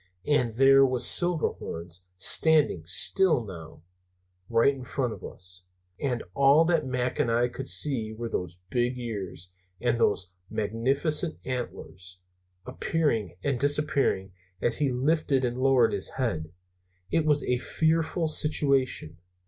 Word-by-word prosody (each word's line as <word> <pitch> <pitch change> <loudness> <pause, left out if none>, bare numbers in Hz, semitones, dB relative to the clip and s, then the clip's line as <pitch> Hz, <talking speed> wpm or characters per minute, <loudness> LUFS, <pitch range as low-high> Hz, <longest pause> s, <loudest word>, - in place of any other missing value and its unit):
And 130 -6 +1
there 135 +3 +5
was 130 -2 +1
Silverhorns, 90 - 0
standing 150 - +4
still 150 - +4
now, 80 -5 -11 0.7
right 115 +4 +3
in 135 -2 -9
front 125 -2 -3
of - - -12
us. 90 0 -8 0.3
And 125 -4 -2
all 140 +4 +4
that 165 -4 0
Mac 125 +1 -2
and 140 -5 +1
I 120 +1 +2
could 135 +2 -8
see 120 -7 +1
were 115 +2 -6
those 90 -5 -5
big 125 +1 -1
ears 100 -7 -6 0.3
and 120 0 0
those 95 -5 0 0.2
magnificent 135 - 0
antlers, 95 -7 -6 0.5
appearing 125 - -2
and 135 -4 -1
disappearing 140 -9 0 0.3
as 120 +1 +1
he 145 -2 +1
lifted 135 +1 0
and 120 +1 -3
lowered 130 -3 +3
his - - -1
head. 85 -12 -3 0.6
It 165 - +1
was 150 -2 +1
a 125 0 -1
fearful 160 +4 0
situation. 140 - +1
125 Hz, 130 wpm, -26 LUFS, 110-145 Hz, 0.7 s, there